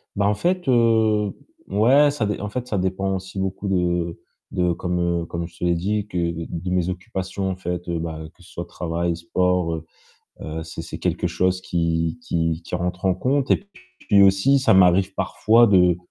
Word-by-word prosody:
Bah, 100 0 +2
en 105 - +3
fait, 175 - -1
heu, 110 -4 +3 0.3
ouais, 135 +8 +4
ça 140 -6 -1
d 105 0 -2
en 105 - -4
fait 125 +4 -5
ça 105 - -1
dépend 95 +1 -1
aussi 95 +1 -7
beaucoup 95 +1 -3
de 85 -2 0 0.3
de 90 -1 +1
comme, 90 +1 -2 0.2
heu, - - -7
comme 85 0 -4
je 85 0 -19
te - - -3
l'ai 85 - +2
dit 105 +4 -1
que 90 - -5 0.3
de 85 +2 -5
mes 90 -1 +1
occupations 95 0 -4
en 95 - -3
fait, 90 -1 -4
heu, 85 -1 -1
bah, 80 -1 -5
que - - -24
ce 90 - -17
soit 85 - -5
travail, 85 0 -2
sport, 90 0 0
heu 80 0 -8 0.5
heu, 80 +1 -5
c'est 80 - -7
c'est - - -8
quelque - - -1
chose 90 0 0
qui 85 +1 -1
qui 80 -4 -1
qui - - -4
rentre 90 +1 -3
en 95 -1 +3
compte 135 +8 0
et 200 - +1 0.3
puis 100 -1 +4
aussi 100 +9 +4
ça 130 - +3
m'arrive 95 +1 +4
parfois 115 +2 +3
de, 90 -3 +4
95 Hz, 200 wpm, -22 LUFS, 85-105 Hz, 0.5 s, ouais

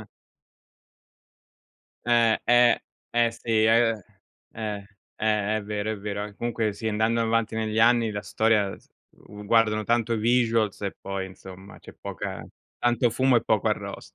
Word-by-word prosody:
ah. - - -17 2.0
Eh, 115 -2 +4
eh, 120 0 +5 0.3
eh, 120 -1 +3
sì 115 -1 0
eh, 115 +1 +4 0.6
eh, 105 -3 -5 0.3
eh 105 -1 0
è 110 - -3
vero, 105 +1 -3
è 105 - -6
vero, 100 0 -4
eh, 105 -1 -9
comunque 115 -2 -2
sì, 110 +2 -4
andando 110 +2 +1
avanti 115 0 0
negli 110 0 -2
anni 115 -1 +4
la 105 0 -4
storia, 110 -3 +1
s - - -27 0.2
uhm, 105 0 -13
guardano 110 -1 +2
tanto 115 0 +1
i - - -1
visuals 115 -2 +1
e 100 -1 -4
poi 95 -1 -4
insomma 95 +1 -12
c'è - - -13
poca - - -6 0.4
tanto 120 0 +2
fumo 130 +1 +3
e - - +2
poco - - +1
arrost - - -5
110 Hz, 155 wpm, -25 LUFS, 105-115 Hz, 2.0 s, eh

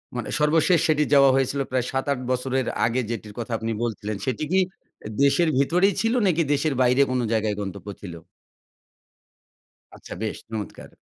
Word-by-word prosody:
মানে 120 - -4
সর্বশেষ 160 +3 +3
সেটি 150 -1 +3
যাওয়া 140 -1 +7
হয়েছিল 135 +1 0
প্রায় 125 -1 0
৭-৮ 135 0 -1
বছরের 130 0 -1 0.2
আগে, 120 +3 0
যেটির 110 -3 -5
কথা 120 +1 -5
আপনি 115 0 -3
বলছিলেন, 110 -2 -3
সেটি 130 +1 -2
কি 190 - +4 0.6
দেশের 160 +4 +3
ভিতরেই 180 +8 +3
ছিল? 225 +1 +1
নাকি 170 -2 +2
দেশের 145 +1 0
বাইরে 125 +2 +4
কোন 130 - 0
জায়গায় 110 -2 0
গন্তব্য 95 0 -7
ছিল? 90 -4 -7 1.8
আচ্ছা - - -10
বেশ, 110 - -3
চমৎকার! 110 -2 -7
130 Hz, 150 wpm, -24 LUFS, 115-150 Hz, 1.8 s, যাওয়া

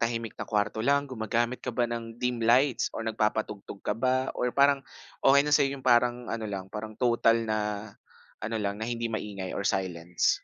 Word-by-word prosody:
tahimik 115 -1 -1
na - - -4
kuwarto 105 0 0
lang, 140 +2 +3
gumagamit 120 0 -1
ka 125 - -2
ba 120 0 +1
ng 115 -1 -5
dim 125 -1 -1
lights 125 +1 +3
or 115 - -5
nagpapatugtog 105 -2 -2
ka 105 - 0
ba 130 +2 +1
or 125 - 0
parang 140 +1 +4 0.4
okey 140 +1 +6
na 150 - 0
sa'yo 140 -2 +3
'yung 130 - -15
parang 120 0 +3
ano 115 -1 -3
lang, 95 -2 -4
parang 110 0 -6
total 115 -2 +3
na 110 -1 0 0.8
ano 115 +1 -2
lang, 100 -1 -1
na 110 - -2
hindi 115 -1 -2
maingay 100 -4 -4
or - - -2
silence? 90 -3 0
115 Hz, 190 wpm, -28 LUFS, 105-125 Hz, 0.8 s, okey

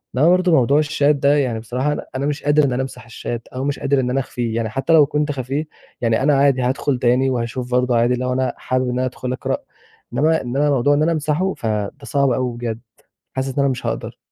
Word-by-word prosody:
إنما 150 +6 +4
برضه 180 0 +3
موضوع 140 -1 +4
الشات 150 -1 +2
ده 140 +1 +3
يعني 125 -6 0
بصراحة 125 +6 -2
أنا - - -5
أنا 135 +2 -1
مش 145 0 -2
قادر 150 +1 +4
إن 135 -3 +1
أنا 125 - 0
أمسح 125 -2 -7
الشات 120 0 -6
أو 130 +1 -5
مش 145 0 -2
قادر 140 0 +1
إن 125 -1 0
أنا 130 +2 +1
أخفيه. 120 -3 -3
يعني 115 -1 -1
حتّى 135 +8 0
لو 155 -3 +7
كنت 150 +1 -1
خافيه 135 +3 -3 0.4
يعني 115 +1 +1
أنا 145 0 +4
عادي 135 -2 +3
هادخل 130 +1 0
تاني، 125 +2 +2
وهاشوف 125 0 -3
برضه 125 0 +2
عادي 120 +2 +3
اللي 125 +1 -2
هو 125 - 0
أنا 130 0 0
حابب 130 0 -1
إن - - -1
أنا 125 +1 0
أدخل 125 0 -4
أقرأ - - -2 0.6
إنّما 160 +2 +2
إن 125 +1 -4
أنا 145 +1 +3
موضوع 140 0 +3
إن 150 - +2
أنا 165 - +2
أمسحه، 155 +4 0
فده 105 -3 -2
صعب 140 -1 +1
أوي 125 0 -1
بجد. 115 -2 -4 0.5
حاسس 130 0 -2
إن - - -1
أنا 140 - +3
مش 130 - -4
هاقدر. - - -4
130 Hz, 245 wpm, -20 LUFS, 125-145 Hz, 0.6 s, لو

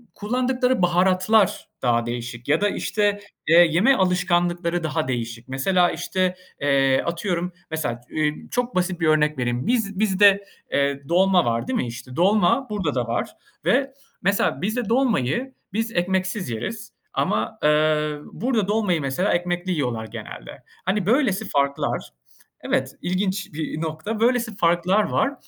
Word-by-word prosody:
kullandıkları 250 +1 0
baharatlar 185 +4 +2
daha 120 -2 +2
değişik 120 +1 -6
ya 155 +6 +2
da 205 - +3
işte, 205 -1 0 0.3
eee, 170 +1 +7
yeme 220 +12 +4
alışkanlıkları 175 -2 +1
daha 155 -2 -1
değişik. 115 -1 -4
Mesela 175 +7 +2
işte, 185 +2 -1 0.3
eee, 135 -2 +3
atıyorum, 175 +1 -2 0.2
mesela, 120 -7 -3
iii, 150 -1 -2
çok 245 -2 -1
basit 180 -1 0
bir 160 - +2
örnek 150 -1 +3
vereyim. 120 +1 -2
Biz 215 -5 0
bizde, 200 -1 +4 0.3
eee, 140 0 +1
dolma 185 0 +4
var 115 0 -1
değil 260 -2 -1
mi 125 - -1
işte? 125 +2 -8
Dolma, 205 +7 +3
burada 190 -10 -2
da 120 -2 -1
var 115 - -1 0.4
ve 270 +2 +2 0.3
mesela 200 -1 +1
bizde 220 +3 -2
dolmayı, 245 - +1 0.2
biz 225 +1 -1
ekmeksiz 185 - -1
yeriz. 210 - -5 0.2
Ama, 220 - -1
eee, 150 0 +2 0.2
burada 230 -4 0
dolmayı 205 -6 +1
mesela 140 +8 0
ekmekli 175 +1 -1
yiyorlar 125 -8 -1
genelde. - - -9 0.2
Hani 190 0 0
böylesi 220 -4 +1
farklar 140 0 -1 0.5
evet, - - -1
ilginç 190 0 -2
bir 155 0 -4
nokta, 160 +8 -4
böylesi 235 -2 +1
farklar 175 +4 +2
var. 275 +6 0
180 Hz, 140 wpm, -23 LUFS, 150-210 Hz, 0.5 s, eee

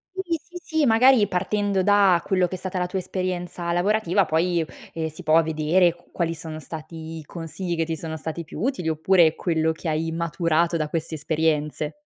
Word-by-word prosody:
Sì, 355 -4 -2
sì, 355 +2 -10 0.2
sì 300 - +4
magari 235 -1 +6
partendo 200 +1 0
da 200 -3 +5
quello 185 -2 +2
che 185 - -4
è - - -11
stata 185 +1 -4
la 180 - 0
tua 190 +2 -3
esperienza 180 -2 -3
lavorativa, 195 +1 +2
poi, 165 +1 +1 0.3
ehm, 160 0 -2
si 160 +3 -9
può 160 0 +5
vedere 160 +3 +2
q 175 - -25
quali 165 -2 -1
sono 155 0 -7
stati 160 +1 -8
i 155 - -10
consigli 170 +3 -4
che 165 - +1
ti 165 0 -3
sono 160 0 -5
stati 160 +2 -5
più 155 - -9
utili, 255 -9 -1
oppure 160 +1 +4
quello 160 -2 +1
che 160 +1 -6
hai 160 +1 -1
maturato 170 0 +1
da 155 -2 -1
queste 160 +1 -3
esperienze. 150 -1 -1
170 Hz, 195 wpm, -24 LUFS, 160-185 Hz, 0.3 s, magari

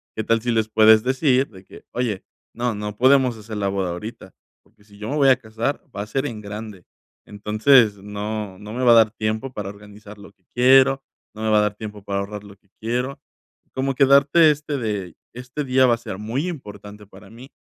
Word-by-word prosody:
¿qué 110 - -3
tal 115 +1 +1
si 120 +1 -1
les 110 -1 +1
puedes 110 0 +6
decir 130 0 +2
de 95 -3 -15
que: - - -15
"Oye, 115 -6 -2 0.3
no, 120 0 -2
no 105 0 -6
podemos 130 -1 +4
hacer 110 0 -8
la 100 -1 -1
boda 95 -2 -2
ahorita, 110 +7 -8 0.3
porque 110 -1 -28
si 100 -1 -19
yo 105 +2 -6
me - - -1
voy 140 -2 +5
a 130 - +6
casar, 115 +3 -4
va 100 - -3
a - - -11
ser 135 +6 -2
en 110 -5 -7
grande. 105 -2 -8 0.4
Entonces, 105 +2 +3
no 105 0 -5
no 105 +1 -9
me 125 +2 -3
va 120 - +6
a - - +7
dar 110 -2 +5
tiempo 110 +4 -3
para 105 -3 -5
organizar 105 +1 -13
lo 100 0 -14
que - - -44
quiero, 135 +2 +5 0.3
no 110 - -7
me 110 - 0
va 105 0 +4
a - - +4
dar 105 -1 -1
tiempo 105 -1 -8
para 100 -1 -2
ahorrar 105 +1 -7
lo 100 -1 -14
que 100 - -38
quiero", 125 +4 -3 0.5
como 135 +1 -1
que 135 - +4
darte 140 +4 +5
este 150 0 -4
de: 100 -7 -4 0.2
"Este 125 +4 -6
día 130 0 +3
va 120 - +4
a - - -11
ser 115 -5 -7
muy 120 +10 -3
importante 105 - -9
para 95 0 -16
mí, 120 +5 -14
110 Hz, 225 wpm, -22 LUFS, 105-125 Hz, 0.5 s, a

